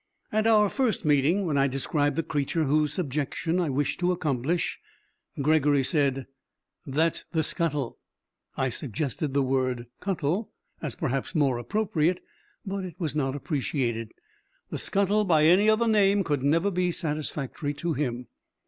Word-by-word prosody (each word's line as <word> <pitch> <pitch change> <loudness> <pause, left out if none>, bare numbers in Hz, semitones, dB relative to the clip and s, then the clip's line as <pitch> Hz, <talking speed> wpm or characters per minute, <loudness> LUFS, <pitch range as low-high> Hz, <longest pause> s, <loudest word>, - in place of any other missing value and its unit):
At 215 +1 +2
our 210 -2 +5
first 235 - 0
meeting, 150 +7 +3
when 150 -5 +1
I 135 - +4
described 145 +2 0
the 165 - 0
creature 150 +2 -1
whose 150 +1 +2
subjection 155 +1 -1
I 170 -4 0
wished 140 +1 -1
to 180 0 +2
accomplish, 155 -1 -1 0.6
Gregory 145 -1 +3
said, 135 -2 +1 0.6
'That's 155 +4 0
the 160 -1 +2
scuttle.' 150 -6 -2 0.6
I 130 - +1
suggested 140 +3 -3
the 140 - +3
word 130 -2 0
cuttle, 185 +2 -1 0.3
as, 150 -6 -3
perhaps, 135 +7 -2
more 135 -6 +2
appropriate, 175 - 0 0.5
but 195 -1 -3
it 180 -3 -7
was 160 -6 -2
not 135 -2 0
appreciated. 130 -6 -2 0.6
The - - -3
scuttle 200 +2 +2
by 160 -6 +4
any 190 +6 +5
other 225 +2 +3
name 205 -2 +4
could 145 -6 -1
never 165 +8 +2
be 180 -1 +1
satisfactory 150 -3 -3
to 170 +2 -2
him. 125 -4 -2
150 Hz, 150 wpm, -27 LUFS, 135-180 Hz, 0.6 s, our